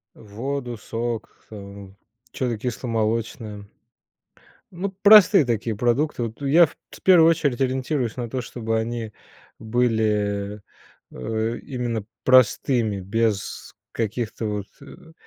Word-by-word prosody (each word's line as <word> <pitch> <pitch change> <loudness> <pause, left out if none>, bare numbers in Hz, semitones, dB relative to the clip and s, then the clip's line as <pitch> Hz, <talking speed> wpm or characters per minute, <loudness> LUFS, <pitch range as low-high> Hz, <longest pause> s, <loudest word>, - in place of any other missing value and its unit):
Воду, 120 +4 -5
сок, 115 0 -4
э, 100 -2 -10 0.4
чё-то 125 -2 -2
кисломолочное. 110 -3 -3 1.1
Ну, 190 +2 -4
простые 205 -5 +8
такие 115 -1 -1
продукты. 120 +4 0
Вот 115 +3 -6
я 150 +5 +6
в - - -13 0.2
в - - -13
первую 170 -3 +6
очередь 145 -6 0
ориентируюсь 130 -2 -1
на 120 -2 -4
то, 130 +2 -3
чтобы 115 -1 -3
они 115 -1 -3 0.4
были, 105 -3 0 0.5
э, 110 - -3
именно 120 -4 -4 0.2
простыми, 125 -4 +3
без 105 +1 -2 0.2
каких-то 115 0 -3
вот, 105 -1 -3 0.2
э, 160 +3 -14
115 Hz, 110 wpm, -23 LUFS, 110-130 Hz, 1.1 s, простые